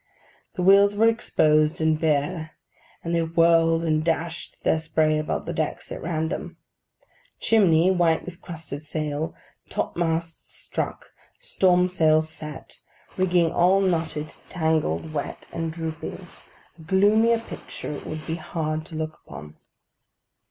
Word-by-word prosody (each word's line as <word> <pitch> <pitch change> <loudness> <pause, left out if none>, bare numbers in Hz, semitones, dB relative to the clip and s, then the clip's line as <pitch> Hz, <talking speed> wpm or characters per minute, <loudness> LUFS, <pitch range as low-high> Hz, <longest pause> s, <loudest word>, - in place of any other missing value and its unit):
The 180 - -2
wheels 200 +2 +6
were 225 +2 +4
exposed 155 -8 +2
and 160 -1 +2
bare; 155 +1 0 0.5
and 170 - -3
they 170 - +2
whirled 165 0 +3
and 155 -1 +1
dashed 165 0 -2
their 160 - +2
spray 155 -1 +1
about 155 - -3
the - - -3
decks - - -3
at - - -5
random. 160 -1 -3 0.8
Chimney, 185 -5 +4
white 170 -3 +2
with 175 -1 -9
crusted 160 -4 -7
salt; 155 0 -3 0.3
topmasts 165 -1 -3
struck; - - -5 0.3
storm 180 - +3
sails 155 -3 +3
set; 150 -3 -9 0.4
rigging 175 -3 +2
all 185 +3 +4
knotted, 160 -5 -1 0.2
tangled, 160 - 0
wet, 145 - -4
and 165 -1 -2
drooping: 160 -1 -6 0.5
a - - -11
gloomier 210 +7 +4
picture 230 - -8
it 145 - -7
would 155 0 -6
be 165 0 -3
hard 155 -1 -3
to 165 - -10
look 155 0 -4
upon. 75 0 -10
165 Hz, 130 wpm, -24 LUFS, 155-175 Hz, 0.8 s, wheels